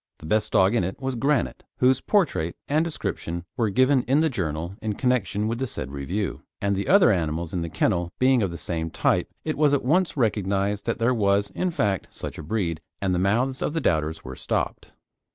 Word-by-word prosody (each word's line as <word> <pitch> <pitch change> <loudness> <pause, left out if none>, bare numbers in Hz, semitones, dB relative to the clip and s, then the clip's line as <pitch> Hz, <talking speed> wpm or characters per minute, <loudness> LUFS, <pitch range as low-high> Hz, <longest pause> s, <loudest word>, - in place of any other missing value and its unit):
The - - -12
best 105 +6 +1
dog 95 +3 +4
in 115 - +2
it 95 +8 -4
was 135 -1 -2
Granite, 135 +3 0
whose 130 0 +3
portrait 165 - +1
and 155 +3 +2
description 85 - -4
were 115 -4 +1
given 130 +5 +4
in 135 +4 +4
the 160 -2 +2
Journal 85 - -3
in 110 -1 -1
connection 120 -4 0
with 115 +1 -2
the 130 - -1
said 65 - -6
review; 85 +9 -3 0.2
and 100 0 0
the 100 - -2
other 195 - +6
animals 85 -2 -1
of 90 - -1
the 85 - -3
kennel 85 +2 0
being 130 -1 +4
of 100 - +1
the 85 - -6
same 80 -2 -3
type, - - +1 0.2
it 155 -2 -2
was 145 -2 +5
at 135 - -2
once 170 +4 +2
recognised 100 -3 0
that 115 - 0
there 115 +2 +2
was, 100 -3 +2
in 180 - -1
fact, 105 - 0
such - - -7
a - - -6
breed, 85 -2 -2 0.2
and 95 -2 0
the 90 - +1
mouths 120 +8 +1
of - - -1
the 165 - 0
doubters 80 - 0
were - - -7
stopped. - - -3
105 Hz, 215 wpm, -25 LUFS, 90-130 Hz, 0.2 s, other